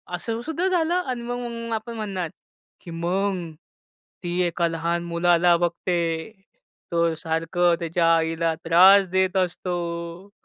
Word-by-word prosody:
असं 225 +6 -4
सुद्धा 330 +4 -1
झालं." 355 0 +1
अन् 240 -2 -3
मग 235 -1 -4
आपण 225 +2 -6
म्हणणार 195 -6 -3 0.5
की 170 - -10
"मग 175 +1 -2 0.7
ती 175 +1 -2
एका 170 0 0
लहान 170 +1 -2
मुलाला 170 0 +3
बघते, 170 +1 -1 0.6
तो 170 -1 +2
सारखं 165 +2 0
त्याच्या 170 0 0
आईला 165 0 0
त्रास 190 +4 +7
देत 190 +1 +1
असतो. 175 0 -3
175 Hz, 120 wpm, -24 LUFS, 170-200 Hz, 0.7 s, त्रास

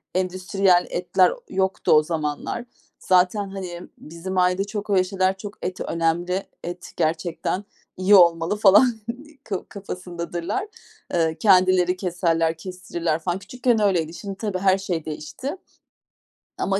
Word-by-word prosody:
endüstriyel 185 0 +2
etler 180 +1 +2 0.2
yoktu 190 0 0
o 155 0 +6
zamanlar. 155 +8 -3 0.3
Zaten, 185 +2 +2
hani, 180 -3 -6 0.2
bizim 170 +4 -7
ailede 180 +1 +3
çok 205 +1 -6
öyle 190 -2 +4
şeyler, 190 0 0
çok 205 +1 -8
et 180 0 -4
önemli. 175 +3 0 0.2
Et 175 +1 -7
gerçekten 165 +3 -1 0.3
iyi 190 +2 +5
olmalı 170 +1 +5
falan 205 +4 +7 0.6
ka 195 -3 -4
kafasındadırlar. 180 - -5 0.5
Eee, 160 -2 +1
kendileri 185 -2 +4
keserler, 165 -3 0
kestirirler 170 -2 -3
falan. 175 +2 -2
Küçükken 245 +1 0
öyleydi. 170 -6 +1
Şimdi 195 +2 -6
tabii 205 -4 -2
her 190 0 +4
şey 180 -5 -3
değişti 160 - -5 1.0
ama. 195 0 0
185 Hz, 125 wpm, -23 LUFS, 170-195 Hz, 1.0 s, falan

